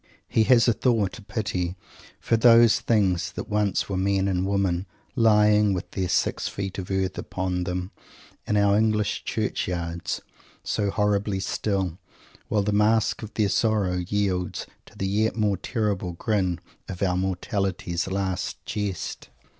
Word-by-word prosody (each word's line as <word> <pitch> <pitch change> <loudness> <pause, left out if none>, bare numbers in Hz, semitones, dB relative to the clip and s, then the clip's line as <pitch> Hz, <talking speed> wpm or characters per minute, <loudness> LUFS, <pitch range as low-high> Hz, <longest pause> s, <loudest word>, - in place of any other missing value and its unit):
He 110 - +2
has 120 -2 +5
a 120 - +5
thought, 110 -3 0
a - - -12
pity, 100 -4 -3 0.4
for 115 - +1
those 115 0 +6
things 95 -6 +1
that - - -6
once 105 -2 +1
were 100 - -3
men 95 +1 +1
and 95 -1 0
women, 95 -2 0 0.3
lying, 105 -3 +4
with 90 - -5
their 95 -2 -2
six 95 - +1
feet 95 -1 -4
of 90 - -6
earth 95 -1 -1
upon 90 -1 -2
them, 90 +1 -3 0.6
in 105 - +1
our 100 -1 +4
English 105 -1 +1
Churchyards, 85 -1 -2 0.4
so 100 -1 -1
horribly 105 -1 0
still, 95 -3 -2 0.5
while 105 -2 +1
the 105 - 0
mask 105 +1 +2
of 110 -1 -9
their 105 -2 +2
sorrow 105 -4 +1
yields 90 -1 -1 0.2
to - - -17
the 95 - -2
yet 105 +3 +1
more 105 -3 +1
terrible 100 -3 -2
grin 95 -2 0 0.3
of 95 0 -4
our 90 -2 +2
mortality's 95 -1 -2
last 95 -1 -2
jest. 100 -5 -4
100 Hz, 150 wpm, -25 LUFS, 90-105 Hz, 0.6 s, those